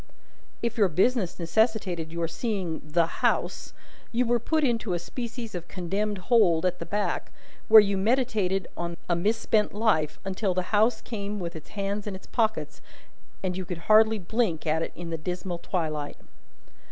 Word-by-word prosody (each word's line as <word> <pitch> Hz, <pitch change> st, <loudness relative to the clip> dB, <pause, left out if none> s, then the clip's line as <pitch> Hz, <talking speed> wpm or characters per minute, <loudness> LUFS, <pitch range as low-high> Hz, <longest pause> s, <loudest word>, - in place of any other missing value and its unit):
If 235 Hz, 0 st, -1 dB
your 205 Hz, -, +6 dB
business 190 Hz, +2 st, +1 dB
necessitated 180 Hz, -3 st, 0 dB
your 170 Hz, 0 st, -1 dB
seeing 180 Hz, -2 st, -3 dB
"the 160 Hz, +3 st, +2 dB, 0.2 s
House," -, -, 0 dB, 0.4 s
you 245 Hz, +2 st, +2 dB
were 240 Hz, 0 st, +2 dB
put 310 Hz, +7 st, 0 dB
into 230 Hz, -7 st, +1 dB
a -, -, +1 dB
species 235 Hz, +5 st, -6 dB
of 175 Hz, -1 st, -6 dB
Condemned 200 Hz, +3 st, -2 dB
Hold 185 Hz, -5 st, +3 dB
at 180 Hz, -1 st, 0 dB
the -, -, -6 dB
back, 205 Hz, 0 st, -2 dB, 0.4 s
where 220 Hz, -1 st, +10 dB
you 200 Hz, -1 st, 0 dB
meditated 205 Hz, -4 st, +1 dB
on 170 Hz, 0 st, -4 dB
a 175 Hz, -, +2 dB
misspent 210 Hz, +3 st, +1 dB
life, 160 Hz, -9 st, +1 dB
until 195 Hz, 0 st, -1 dB
the 185 Hz, 0 st, -2 dB
House 220 Hz, +2 st, +3 dB
came 205 Hz, -2 st, -4 dB
with 170 Hz, -2 st, -5 dB
its 155 Hz, -, -10 dB
hands 200 Hz, +1 st, -2 dB
in 200 Hz, -, -4 dB
its 190 Hz, -, -11 dB
pockets, 220 Hz, -2 st, -1 dB, 0.6 s
and 185 Hz, -1 st, -1 dB
you 185 Hz, -, -3 dB
could 180 Hz, -1 st, -5 dB
hardly 220 Hz, +1 st, +6 dB
blink 200 Hz, -3 st, -1 dB
at 160 Hz, +1 st, +1 dB
it -, -, -3 dB
in 170 Hz, -1 st, -6 dB
the 165 Hz, -, -3 dB
dismal 180 Hz, +1 st, -4 dB
twilight. 155 Hz, -5 st, -3 dB
195 Hz, 170 wpm, -27 LUFS, 170-220 Hz, 0.6 s, where